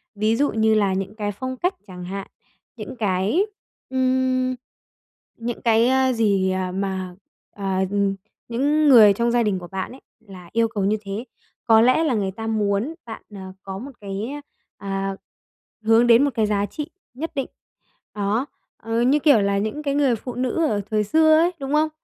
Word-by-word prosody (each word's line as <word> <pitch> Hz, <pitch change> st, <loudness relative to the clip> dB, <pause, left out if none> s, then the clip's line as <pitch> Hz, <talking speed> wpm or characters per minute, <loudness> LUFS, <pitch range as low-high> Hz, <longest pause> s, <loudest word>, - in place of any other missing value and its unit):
Ví 215 Hz, +2 st, +1 dB
dụ 285 Hz, +4 st, +1 dB
như 220 Hz, 0 st, +2 dB
là 200 Hz, -3 st, +2 dB
những 195 Hz, +2 st, -3 dB
cái 205 Hz, -2 st, -2 dB
phong 260 Hz, +5 st, -5 dB
cách 360 Hz, +7 st, 0 dB
chẳng 180 Hz, -1 st, -9 dB
hạn, 195 Hz, +1 st, -6 dB, 0.5 s
những 215 Hz, +2 st, -7 dB
cái, 210 Hz, -, +1 dB, 0.4 s
ưm, 255 Hz, 0 st, +1 dB, 0.8 s
những 235 Hz, 0 st, -5 dB
cái, 230 Hz, 0 st, +4 dB
ơ, 260 Hz, 0 st, +3 dB
gì, 200 Hz, -5 st, +2 dB
à, 185 Hz, -1 st, -2 dB
mà, 190 Hz, -1 st, -3 dB, 0.4 s
ờ, 200 Hz, -, -8 dB, 0.3 s
ừm, 200 Hz, -1 st, +1 dB, 0.3 s
những 290 Hz, +5 st, +2 dB
người 220 Hz, -6 st, +8 dB
trong 235 Hz, +3 st, 0 dB
gia 240 Hz, -1 st, +2 dB
đình 200 Hz, -3 st, 0 dB
của 175 Hz, -, -9 dB
bạn 190 Hz, 0 st, -5 dB
ấy 260 Hz, -, -13 dB, 0.3 s
là 180 Hz, -3 st, -12 dB
yêu 230 Hz, 0 st, +3 dB
cầu 210 Hz, -4 st, -2 dB
như 210 Hz, +2 st, +2 dB
thế. 200 Hz, +3 st, -5 dB, 0.4 s
Có 225 Hz, -1 st, +6 dB
lẽ 255 Hz, +7 st, +4 dB
là 300 Hz, -5 st, +1 dB
người 195 Hz, -3 st, -1 dB
ta 225 Hz, +3 st, -6 dB
muốn 215 Hz, +6 st, 0 dB
bạn, 220 Hz, -2 st, -8 dB
à, 190 Hz, -1 st, -8 dB
có 190 Hz, -1 st, -6 dB
một 270 Hz, +6 st, -8 dB
cái, 200 Hz, +3 st, -4 dB, 0.5 s
à, 195 Hz, 0 st, -3 dB, 0.7 s
hướng 225 Hz, +2 st, +5 dB
đến 240 Hz, +3 st, +6 dB
một 285 Hz, -, 0 dB
cái 220 Hz, -, +2 dB
giá 205 Hz, -1 st, +1 dB
trị 295 Hz, +9 st, -6 dB, 0.2 s
nhất 310 Hz, +6 st, -5 dB
định. 270 Hz, -2 st, -1 dB, 0.7 s
Đó, 210 Hz, +5 st, 0 dB, 0.3 s
ờ, 225 Hz, +1 st, -2 dB
như 265 Hz, +5 st, +3 dB
kiểu 290 Hz, -6 st, +5 dB
là 200 Hz, 0 st, +1 dB
những 220 Hz, +9 st, -3 dB
cái 280 Hz, -1 st, -1 dB
người 280 Hz, -4 st, +3 dB
phụ 245 Hz, +3 st, -7 dB
nữ 255 Hz, +6 st, 0 dB
ở 205 Hz, -5 st, 0 dB
thời 215 Hz, -1 st, +2 dB
xưa 315 Hz, +8 st, +4 dB
ấy, 340 Hz, +2 st, +3 dB
đúng 275 Hz, +1 st, -4 dB
không? 310 Hz, +1 st, +3 dB
225 Hz, 190 wpm, -22 LUFS, 200-260 Hz, 0.8 s, người